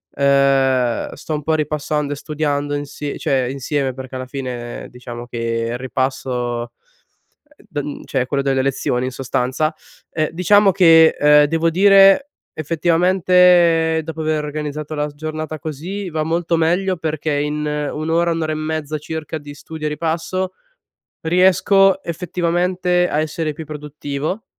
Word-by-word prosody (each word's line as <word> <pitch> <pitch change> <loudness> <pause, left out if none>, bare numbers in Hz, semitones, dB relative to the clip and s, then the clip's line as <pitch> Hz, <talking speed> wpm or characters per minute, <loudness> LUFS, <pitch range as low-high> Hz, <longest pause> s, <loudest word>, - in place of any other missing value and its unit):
ehm, 135 -3 +2
sto 155 - -6
un 150 - -5
po' 160 - 0
ripassando 150 -1 -1
e - - -5
studiando 145 -1 -2
insi 145 0 -5
cioè 135 -1 +1
insieme, 135 0 -2
perché 130 0 -9
alla 130 0 -4
fine 125 -3 -6
diciamo 120 -1 -9
che 115 -1 -2
il - - -3
ripasso 125 -2 -2 1.0
don 145 0 -5
cioè 135 - -1
è - - -1
quello 140 +2 -1
delle 135 -1 +1
lezioni 130 -2 -1
in 130 - -3
sostanza. 130 +4 -1 0.3
E 155 -1 -1
diciamo 195 +3 +4
che, 165 -4 +6
ehm, 150 0 +6
devo 165 +2 +1
dire, 195 - +6 0.3
effettivamente, 170 0 +3
dopo 160 0 -6
aver 155 -1 0
organizzato 150 0 -5
la 150 0 -1
s - - -15
giornata 155 +1 -5
così 170 +7 -5
va 155 -1 -2
molto 170 +1 0
meglio, 180 +3 +1
perché 155 -1 -2
in 150 +1 -1
1 150 +1 -3
ora, 170 +1 +2
1 165 0 -1
ora 155 0 -1
e - - -3
mezza 155 -1 -3
circa 160 +1 -5
di 145 -1 -10
studio 155 +2 -8
e - - 0
ripasso 165 +4 -2 0.7
riesco 190 +3 +4
effettivamente 180 +1 0
a 150 - 0
essere 155 0 -2
più 160 - -7
produttivo, 150 - -5
155 Hz, 150 wpm, -19 LUFS, 140-165 Hz, 1.0 s, che